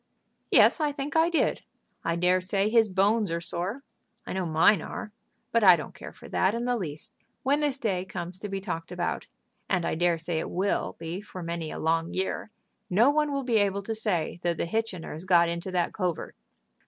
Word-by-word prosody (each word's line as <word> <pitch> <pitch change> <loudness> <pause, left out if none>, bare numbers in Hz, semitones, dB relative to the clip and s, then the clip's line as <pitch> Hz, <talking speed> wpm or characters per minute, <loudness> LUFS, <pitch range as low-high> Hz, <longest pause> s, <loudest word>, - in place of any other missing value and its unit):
"Yes; - - +6
I 300 -1 +2
think 285 +1 -5
I 325 +1 +5
did. 340 - +1 0.4
I 165 0 0
dare 180 +2 +3
say 195 +3 0
his 225 -2 +5
bones 200 +2 +2
are 165 0 -1
sore. 180 +9 -4 0.4
I - - -5
know 185 -2 -1
mine 160 +4 +4
are. 210 - -6 0.4
But 230 -2 +3
I 185 -3 +9
don't 150 - -7
care - - -9
for - - -13
that 190 +4 +2
in 235 +1 -2
the 245 0 +1
least. 160 -9 -6 0.3
When 280 +3 +2
this 290 -3 0
day 195 -8 -1
comes 185 -1 -5
to 210 - -5
be 195 0 -2
talked 165 -3 -5
about, 175 -1 -2 0.4
as 180 -3 +1
I - - 0
dare 175 +1 +2
say 165 0 -2
it - - -4
will 190 +3 -1
be 165 +3 -5
for 185 -3 -8
many 170 -1 -4
a - - -6
long 165 +1 0
year, 190 +3 -2 0.4
no 225 +9 +5
one 300 0 +1
will 275 -1 -1
be 240 -3 +2
able 200 -1 +1
to 225 - -3
say 195 -7 -1
that 175 -2 0
the - - -1
Hitchiners 185 -4 -3
got 170 -2 +5
into 170 +2 -4
that 180 -2 0
covert." 180 -5 -3
185 Hz, 210 wpm, -27 LUFS, 170-220 Hz, 0.4 s, I